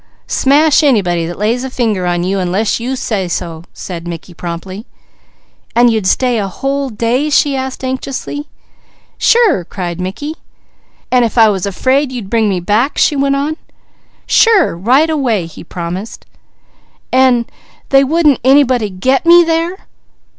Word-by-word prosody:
"Smash 295 +3 +3
anybody 185 - +1
that 175 - -7
lays 230 +5 -1
a 265 - -4
finger 220 -8 -1
on 175 0 0
you, 190 +2 -1
unless 190 +5 -1
you 250 +3 -3
say 215 -8 -2
so," 165 -1 -5
said 170 -2 -8
Mickey 170 +1 -8
promptly. 180 +6 -7 0.9
"And 240 0 +5
you'd 215 -4 -1
stay 245 +3 +1
a 200 - -2
whole 275 +7 -3
day?" 240 +6 -1
she 285 -1 +2
asked 265 0 -5
anxiously. 265 +3 -4 0.7
"Sure!" 450 - +3
cried 175 -1 -5
Mickey. 195 +12 -5 0.8
"An' 250 -1 +4
if 230 +1 -2
I 225 -2 +6
was 195 -2 -2
afraid 260 +8 0
you'd 230 -7 -7
bring 225 -2 +2
me 190 -2 -1
back?" 215 - 0
she 300 - +3
went 275 0 +1
on. 295 +3 -2 0.7
"Sure! 425 - +3
Right 250 - +2
away!" 255 - 0
he 165 - -11
promised. 180 +5 -7 0.9
"An' 255 -2 +3 0.4
they 270 0 +5
wouldn't 300 0 +2
anybody 260 -4 +3
'get' 255 +9 0
me 345 +1 +8
there?" 335 +3 -2
240 Hz, 150 wpm, -14 LUFS, 190-275 Hz, 0.9 s, me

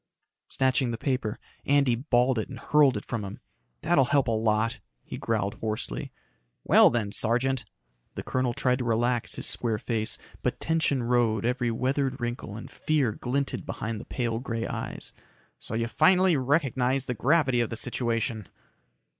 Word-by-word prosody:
Snatching 130 -1 +1
the 115 - -3
paper, 125 -5 -1 0.3
Andy 140 -3 +3
balled 125 -1 +2
it 110 - -4
and 130 - -7
hurled 140 0 +3
it 105 - -7
from 115 -3 -3
him. 100 - -7 0.4
"That'll 135 - +4
help 140 +2 +2
a - - +1
lot," 110 +1 +1 0.2
he - - -7
growled 105 -3 -1
hoarsely. 110 -1 -3 0.5
"Well, - - +7
then, 110 -4 -1
Sergeant." 125 +3 +1 0.5
The - - -5
colonel 130 -2 -1
tried 125 0 +1
to - - -1
relax 120 +1 0
his - - -4
square 115 -3 0
face, 110 0 -2 0.2
but - - -1
tension 160 -5 +1
rode 115 -3 +1
every 125 0 0
weathered 130 +3 -1
wrinkle 120 -3 -4
and 110 - -8
fear 150 -7 +1
glinted 135 +6 -2
behind 110 0 -4
the - - -11
pale 115 -3 -2
gray 115 -3 -3
eyes. - - -4 0.5
"So - - -5
you 115 +1 0
finally 185 +6 +4
recognize 135 -2 +1
the 125 - -2
gravity 130 0 +2
of 115 - -1
the 115 - -4
situation." 115 -3 -2
120 Hz, 165 wpm, -27 LUFS, 115-135 Hz, 0.5 s, Well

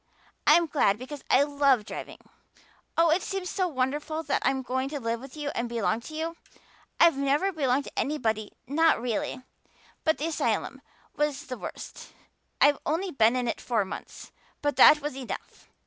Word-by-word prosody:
I'm 335 +3 +6
glad 275 -10 +2
because 260 +4 -8
I 270 - +6
love 280 -6 +2
driving. - - -7 0.8
Oh, 330 -1 +5
it 340 +4 +3
seems 385 -2 -4
so 370 -2 0
wonderful 295 +2 -2
that - - 0
I'm 265 0 +1
going 260 +1 -2
to 290 0 -4
live 230 -1 -2
with 270 +3 -11
you 295 -1 -3
and 235 0 -2
belong 225 -1 0
to 310 +6 -9
you. 330 +1 -3 0.6
I've 335 -5 +6
never 285 +8 +2
belonged 280 -5 +1
to - - -6
anybody 220 -8 -1
not 320 +5 +3
really. 245 +2 -3 0.6
But 315 -3 +2
the 295 - -3
asylum 330 - -1 0.3
was 295 -1 -1
the 255 -3 -6
worst. - - -8 0.5
I've 290 -1 +5
only 350 +5 -1
been 230 -3 +3
in 250 -1 -1
it - - -2
four 225 -5 0
months, - - -9 0.3
but 290 0 +1
that 300 0 +8
was 295 -2 -4
enough. 265 -2 -8
280 Hz, 175 wpm, -27 LUFS, 250-310 Hz, 0.8 s, that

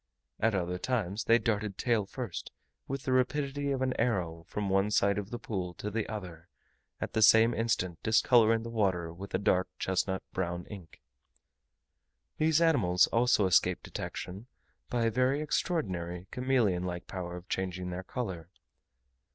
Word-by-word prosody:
At 110 -1 +2
other 90 -1 -1
times 110 -4 -1
they 115 - +6
darted 105 -4 -1
tail 115 -5 +1
first, 120 -4 -6 0.4
with 135 0 -4
the 130 - -1
rapidity 140 +2 0
of 135 -1 0
an 130 -1 0
arrow, 85 -8 -1
from 105 -1 -2
one 95 +1 +2
side 100 -1 +2
of 100 0 -6
the 120 - -4
pool 95 -7 -4
to 105 - -5
the 110 +1 -2
other, 90 -6 -7 0.5
at - - -4
the 110 - +1
same 110 +2 +7
instant 95 -7 -1
discolouring 115 0 +4
the 115 - -6
water 95 -7 0
with 95 +3 -6
a - - +4
dark 95 -1 +2
chestnut 95 0 -1
brown 90 -1 -2
ink. 95 -6 -11 1.4
These 160 +1 +3
animals 100 - +4
also 115 -3 +4
escape 95 - +3
detection 95 +6 -6 0.4
by 120 -1 0
a 115 - +2
very 130 +4 +2
extraordinary, 95 - -2
chameleon 125 -8 +1
like 90 -1 -4
power 90 -2 -5
of 90 +1 -12
changing 90 -1 -3
their 90 +1 -5
colour. 95 -7 -5
105 Hz, 160 wpm, -30 LUFS, 90-120 Hz, 1.4 s, same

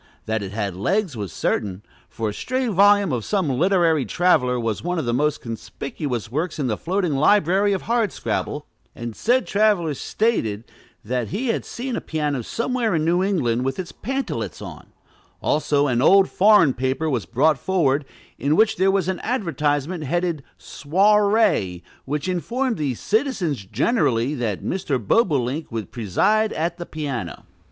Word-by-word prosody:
That 110 0 -1
it 95 -1 -6
had 100 -3 -3
legs 180 - 0
was 100 -6 -5
certain; 100 -1 -2 0.3
for 110 -2 -3
a - - -5
stray 255 - -2
volume 200 -2 +4
of 120 -4 -1
some 190 - 0
literary 165 +2 +2
traveler 125 - +2
was 115 -3 -2
one 175 +1 -1
of 160 - -1
the 120 - 0
most 150 +3 0
conspicuous 120 0 -5
works 155 +6 -2
in 145 - -1
the 115 -4 0
floating 180 - -1
library 195 +6 +3
of 195 - -1
Hardscrabble, 230 -4 -1 0.3
and 120 -2 -6
said 250 +2 +2
traveler 200 -6 +2
stated 125 - -1 0.4
that 125 0 -1
he 240 - -3
had - - -1
seen 250 0 -4
a - - -3
piano 150 -4 -2
somewhere 230 - -1
in 155 -1 0
New 175 +2 +2
England 130 - 0
with 135 0 -2 0.2
pantalets 270 +4 -3
on; - - -9 0.5
also, 145 -1 +1
an 125 -3 +1
old 195 +6 +6
foreign 200 -8 +5
paper 130 +5 -1
was 125 -8 -1
brought 140 +3 +2
forward, 150 -6 +1 0.4
in 145 +2 +1
which 220 +3 +3
there 190 +2 +3
was 195 -2 +1
an 190 -1 -1
advertisement 160 - -1
headed 170 0 -1 0.2
"Soirée," 200 - +2 0.2
which 145 +4 -3
informed 235 +8 -1
the 140 -5 -1
"citizens, 195 - -1
generally," 130 - +1
that 115 -8 -3
Mr. 170 -8 -1
Bobolink 140 - 0
would 115 -2 -5
preside 200 - +1
at 170 +2 -2
the 175 - -6
piano. 135 - -5
155 Hz, 160 wpm, -22 LUFS, 125-200 Hz, 0.5 s, old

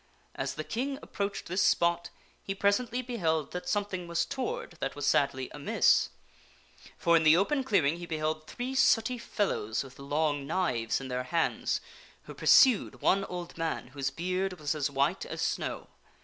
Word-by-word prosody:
As - - -3
the - - -4
King 270 +4 -3
approached 200 -1 -3
this 185 +3 -1
spot, 170 0 +2 0.3
he 195 - -4
presently 230 +5 +1
beheld 160 - -1
that 180 - -5
something 200 -4 -2
was 170 0 0
toward 265 -8 -4
that 135 - -3
was 145 -1 -3
sadly 140 -3 +2
amiss. - - +3 0.9
For, 170 0 +3
in 165 - +5
the 155 +1 +6
open 265 +9 +1
clearing, 170 - +2
he 175 0 -8
beheld 155 -1 -2
three 250 +2 -4
sooty 250 -2 +3
fellows 140 - -1
with 135 0 -14
long 145 0 -1
knives 140 -10 0
in 135 - -6
their 125 0 -2
hands, 165 +4 0 0.4
who - - -10
pursued 255 -6 +4
one 195 0 +3
old 175 -2 -7
man, 165 -6 -2
whose 135 0 -2
beard 185 +4 -2
was 150 +1 -1
as 150 -2 -1
white 140 0 0
as - - -4
snow. - - -2
170 Hz, 165 wpm, -30 LUFS, 145-200 Hz, 0.9 s, the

